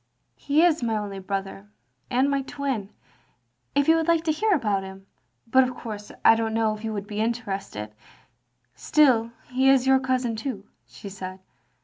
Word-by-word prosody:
" - - -48
He 295 +3 +4
is 330 -4 +3
my 225 -2 0
only 200 -2 -5
brother, 195 - -5 0.4
and 255 +3 +2
my 280 -1 +1
twin. 270 -7 -4 0.9
If 285 0 +2
you 325 - +6
would 325 0 -1
like 335 -1 +3
to 320 - +1
hear 425 +8 0
about 210 - +1
him 190 0 -10 0.2
— 125 - -33
^but 260 - +7
of 255 -1 -1
course 210 -4 -8
I - - +9
don't 225 0 -1
know 220 -1 +2
if 215 +1 -9
you 225 - -2
would 205 -2 -4
be 210 +1 -4
interested 200 - -3 0.5
— 120 0 -47
^still, 235 - +3 0.2
he 260 +1 +3
is 270 -1 +4
your 265 0 +5
cousin 255 -3 -1
too," 220 -3 -5 0.2
she - - -11
said. 190 -1 -7
225 Hz, 195 wpm, -25 LUFS, 195-265 Hz, 0.9 s, I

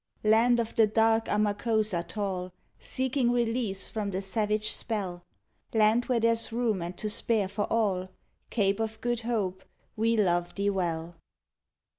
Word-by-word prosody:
Land 230 +3 +4
of 230 -1 -2
the 220 -1 +4
dark 225 +1 +3
Amakosa 210 -2 0
tall, 185 0 -4 0.3
Seeking 260 -1 0
release 230 -5 0
from 210 -2 -2
the 190 0 -3
savage 210 +1 0
spell; 185 -6 -3 0.5
Land 220 +2 +4
where 245 -2 +1
there's 230 0 +2
room 225 -5 0
and 175 +1 -5
to 215 - -3
spare 210 -1 +1
for 205 +2 -3
all, 195 -5 +1 0.4
Cape 200 -2 +1
of 220 0 -3
Good 240 -1 -1
Hope, 205 -5 -2 0.3
we 225 +1 +1
love 175 -4 +1
thee 200 0 +1
well. 170 -3 -3
215 Hz, 145 wpm, -28 LUFS, 190-230 Hz, 0.5 s, Land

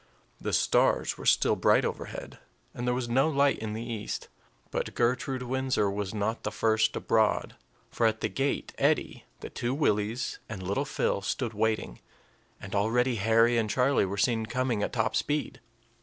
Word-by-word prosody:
The - - -3
stars - - +2
were - - -5
still - - +4
bright - - +3
overhead, - - -6 0.3
and 120 0 -4
there 125 - +2
was 125 -1 -2
no 130 +6 +3
light 140 -2 +2
in 110 -1 -4
the 115 +2 -5
east; 110 -3 -5 0.4
but - - -3
Gertrude 125 +2 0
Windsor 130 -5 0
was 100 -1 -3
not 110 +2 -2
the 105 - -3
first 110 +1 +2
abroad; 110 -2 +1 0.4
for 115 - +2
at 110 0 -1
the - - +1
gate 140 +1 -2
Eddie, - - +1 0.2
the - - -7
two 120 +2 -2
Willies, 115 -3 0
and 100 -4 -6
little 100 +10 -1
Phil 145 -8 -1
stood 115 +3 -2
waiting, 110 - -1 0.6
and 100 - -9
already 115 +4 +1
Harry 115 +3 +4
and 110 -2 -1
Charlie 130 +5 +2
were 100 +2 -4
seen 110 +2 +1
coming 125 -2 -1
at - - -1
top 110 -2 0
speed. 145 +7 -1
115 Hz, 170 wpm, -28 LUFS, 105-125 Hz, 0.6 s, still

